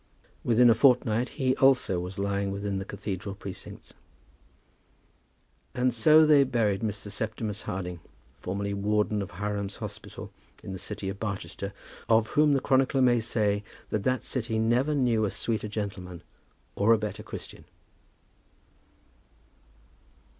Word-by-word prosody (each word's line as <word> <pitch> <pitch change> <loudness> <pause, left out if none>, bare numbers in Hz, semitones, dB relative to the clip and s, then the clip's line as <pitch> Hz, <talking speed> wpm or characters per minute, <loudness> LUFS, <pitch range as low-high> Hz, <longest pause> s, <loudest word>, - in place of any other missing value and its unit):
Within 120 +1 +5
a 115 - +7
fortnight 125 -1 +3
he 130 -3 +2
also 130 -9 +4
was 90 +2 -6
lying 100 0 -1
within 100 0 -3
the 95 - -5
cathedral 100 -1 -5
precincts. 95 -2 -9 1.8
And 125 0 +2
so 155 +7 +6
they 150 -2 +6
buried 115 -6 0
Mr. 105 -2 -4
Septimus 110 -1 -3
Harding, 90 -2 -5 0.4
formerly 100 +2 -3
Warden 105 +1 0
of 95 - -5
Hiram's 100 +1 -3
Hospital - - -8 0.3
in 95 - -6
the 95 - -6
city 100 -1 -5
of 95 +1 -4
Barchester, 100 -2 -4 0.4
of 110 -1 +4
whom 150 -1 +4
the 135 - +3
chronicler 135 0 +2
may 120 -1 +4
say 105 -2 0 0.3
that 105 - 0
that 130 +2 0
city 115 -3 -2
never 120 +7 +2
knew 120 -5 +2
a 105 - +1
sweeter 110 +1 -2
gentleman 100 -5 -5 0.5
or 110 +3 +4
a - - +4
better 105 -2 -4
Christian. - - -9
105 Hz, 135 wpm, -28 LUFS, 100-120 Hz, 1.8 s, a